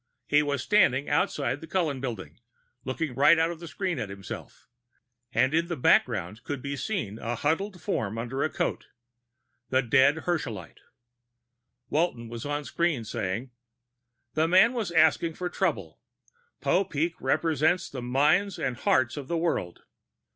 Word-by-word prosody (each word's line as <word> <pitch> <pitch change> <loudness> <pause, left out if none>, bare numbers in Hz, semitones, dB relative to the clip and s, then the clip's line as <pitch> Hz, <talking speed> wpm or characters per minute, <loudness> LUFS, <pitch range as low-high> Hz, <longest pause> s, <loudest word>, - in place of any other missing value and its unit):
He 145 +4 +4
was 140 -3 -1
standing 165 - +3
outside 145 -1 0
the 160 - -9
Cullen 155 -9 -1
Building, 115 -5 -6 0.4
looking 135 +2 -3
right 145 +6 +6
out 165 +1 +2
of 170 - -8
the 170 - -8
screen 180 -3 -3
at 105 - -4
himself, 100 -1 -9 0.6
and 130 +3 +2
in 165 +1 +2
the 170 - -2
background 110 -5 +2
could 145 -2 -4
be 140 +2 -4
seen 125 - -3
a 120 +1 -3
huddled 180 - -1
form 110 -8 -2
under 120 +4 -3
a 155 - +1
coat. - - -2 0.8
The 130 +1 +2
dead 140 +5 +4
Herschelite. 120 - -3 1.1
Walton 125 -8 -1
of 115 - -6
the 145 +2 -3
screen 170 -3 0
was 110 - -9
saying, 110 +8 -3 0.4
"... 120 -1 -53
The 160 +1 +2
man 190 +8 +5
was 225 -7 -2
asking 165 -1 +3
for 180 -1 -4
trouble. - - -2 0.6
Popeek 170 -3 +1
represents 160 +4 +1
the 130 - -7
minds 150 +11 +2
and 125 -3 -2
hearts 130 +1 +2
of 140 -2 -6
the 170 - -1
world. 165 - -2
145 Hz, 155 wpm, -27 LUFS, 120-170 Hz, 1.1 s, right